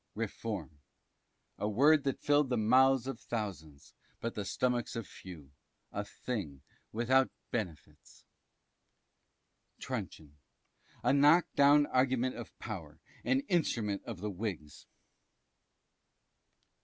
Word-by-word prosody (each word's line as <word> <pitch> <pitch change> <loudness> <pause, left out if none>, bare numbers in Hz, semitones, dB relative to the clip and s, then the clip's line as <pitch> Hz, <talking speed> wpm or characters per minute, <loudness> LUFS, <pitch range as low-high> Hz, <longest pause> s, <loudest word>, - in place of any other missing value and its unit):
Reform. 105 -8 -4 0.8
A 105 - 0
word 140 +7 +4
that 135 - 0
filled 145 -2 +3
the 125 - +1
mouths 130 +3 +4
of 135 - -4
thousands, 90 -11 -6 0.3
but 115 - -3
the 105 - -3
stomachs 120 +4 -1
of 115 -2 -3
few; 80 -9 -12 0.4
a 105 - -3
thing 100 - -5 0.3
without 130 +4 +3 0.2
benefits. 80 -9 -6 1.5
Truncheon. 75 -1 -6 0.6
A - - +3
knock 150 +4 +6
down 145 +1 +6
argument 130 -1 +1
of 120 -1 -9
power, 80 -9 -7 0.2
an 130 +3 +2
instrument 115 - 0
of 110 -7 -7
the 105 0 -2
Whigs. 90 -7 -6
115 Hz, 105 wpm, -32 LUFS, 95-130 Hz, 1.5 s, knock